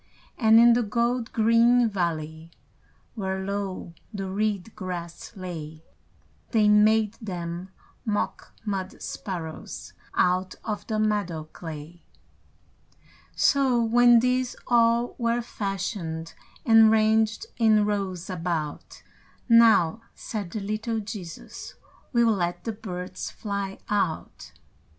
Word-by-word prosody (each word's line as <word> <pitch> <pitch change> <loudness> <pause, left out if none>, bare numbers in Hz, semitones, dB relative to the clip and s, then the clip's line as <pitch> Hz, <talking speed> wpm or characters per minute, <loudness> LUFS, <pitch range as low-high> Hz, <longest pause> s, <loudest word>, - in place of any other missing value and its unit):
And 225 -2 +6
in 235 0 +7
the 240 - +3
gold 235 +2 0
green 230 +2 +4
valley, 165 -5 -3 0.6
Where 190 -3 -3
low 195 -3 -4 0.2
the 195 -3 -4
reed 210 0 -2
grass 175 -3 -6
lay, 160 -4 -7 0.7
They 215 -3 +3
made 215 0 +4
them 175 -2 -5 0.3
mock 210 -2 -2
mud 195 -2 -3
sparrows 170 -5 -6 0.2
Out 185 +1 +1
of 210 -2 -4
the 220 - -1
meadow 205 -7 0
clay. 160 +1 -8 1.3
So, 270 -4 +3
when 240 +1 +5
these 250 0 0
all 235 0 +3
were 235 0 +1
fashioned, 195 -6 -4 0.3
And 225 -1 +7
ranged 220 - +2
in 215 -3 +4
rows 195 -4 -2
about, 165 -4 -4 0.4
"Now," 230 -5 +5
said 205 -5 -5
the 210 +4 -5
little 215 +3 -2
Jesus, 200 -6 -8 0.4
"We'll 235 -2 +4
let 175 -2 -2
the 225 - -3
birds 185 -4 -6
fly 200 -2 -4
out." 195 -6 -2
205 Hz, 110 wpm, -26 LUFS, 180-225 Hz, 1.3 s, in